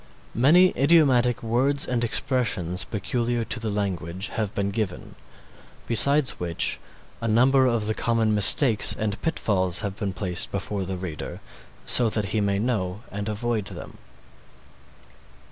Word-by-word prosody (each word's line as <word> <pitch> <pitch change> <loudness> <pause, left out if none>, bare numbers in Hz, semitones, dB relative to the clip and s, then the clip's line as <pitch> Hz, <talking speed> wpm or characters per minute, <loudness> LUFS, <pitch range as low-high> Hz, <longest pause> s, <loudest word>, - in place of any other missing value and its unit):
Many 170 +10 +4
idiomatic 130 -5 +3
words 130 +5 +1
and 120 -2 -1
expressions, 105 -7 -1
peculiar 120 +4 -2
to - - -2
the 110 - -4
language, 95 -2 -3
have 105 -3 -4
been 100 0 -1
given, 100 -4 -4 0.7
besides 140 +4 +3
which 85 -2 -2 0.4
a 115 - -2
number 130 +4 +3
of 115 -3 0
the 110 - -1
common 115 -1 0
mistakes 105 +3 +4
and 105 -1 -3
pitfalls 95 - 0
have 100 -3 -4
been 100 -3 -4
placed 90 -1 -1
before 100 -2 -4
the 95 0 -5
reader 90 -4 -7 0.5
so 120 -2 +4
that 105 -3 -2
he 110 - +1
may 100 -1 0
know 105 -3 -2
and 100 +2 -5
avoid 110 0 -2
them. - - -10
110 Hz, 140 wpm, -24 LUFS, 100-120 Hz, 0.7 s, Many